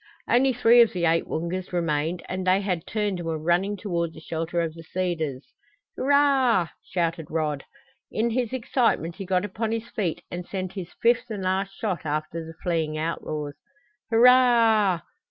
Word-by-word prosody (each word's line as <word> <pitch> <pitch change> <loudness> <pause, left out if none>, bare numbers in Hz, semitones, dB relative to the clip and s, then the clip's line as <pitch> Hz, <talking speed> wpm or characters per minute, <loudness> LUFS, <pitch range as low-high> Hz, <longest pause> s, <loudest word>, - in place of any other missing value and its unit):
Only 260 +2 +4
three 240 -1 +6
of 230 - +4
the 175 -2 0
eight 165 0 +2
Woongas 170 +3 -3
remained 165 -1 -1
and 185 0 -4
they 185 +2 +4
had 180 -5 -2
turned 205 -4 -1
and 170 - -5
were 160 -1 -1
running 175 +6 +1
toward 170 -5 -2
the - - -9
shelter 165 +2 -3
of 165 -2 -1
the 165 - -11
cedars. 165 -6 -3 0.4
"Hurrah!" 265 - +3
shouted 165 -3 -2
Rod. 150 -3 -2 0.5
In 230 +2 0
his 240 -1 -1
excitement 235 - 0
he 195 - -6
got 185 +1 +1
upon 215 +3 -3
his 230 0 -3
feet 185 -8 -2
and 175 +1 -4
sent 185 0 -5
his 190 -3 -6
fifth 235 +1 +3
and 205 -4 -4
last 195 +1 -1
shot 200 -6 -2
after 155 +2 -3
the 165 0 -10
fleeing 160 -3 -1
outlaws. 155 -2 -3 0.6
"Hurrah! 230 -6 +5
185 Hz, 170 wpm, -25 LUFS, 165-220 Hz, 0.6 s, three